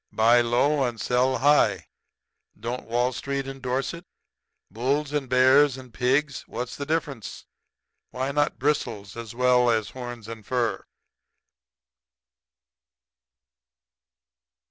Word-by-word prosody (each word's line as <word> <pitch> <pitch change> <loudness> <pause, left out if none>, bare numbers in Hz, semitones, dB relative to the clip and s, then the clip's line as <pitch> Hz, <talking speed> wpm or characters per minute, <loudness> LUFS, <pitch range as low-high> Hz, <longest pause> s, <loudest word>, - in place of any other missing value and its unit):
Buy 115 +2 +5
low 135 +5 +2
and 120 -3 -2
sell 125 +3 +1
high 145 +4 +3 0.7
don't 120 +2 -5
Wall 120 +2 +1
Street 135 +2 -3
endorse 135 0 -3
it? 170 +1 -10 0.6
Bulls 140 +5 -1
and 140 -4 -2
bears 130 +2 +5
and 130 -3 -12
pigs 135 +3 0
what's 125 0 -5
the 140 - -6
difference? 150 -7 -3 0.6
Why 130 +2 -3
not 145 +1 0
bristles 120 -8 -2
as 115 -1 -8
well 125 0 +4
as 110 -2 0
horns 120 -3 -8
and 115 -1 -8
fur?" 120 0 -1
125 Hz, 110 wpm, -25 LUFS, 120-140 Hz, 0.7 s, Buy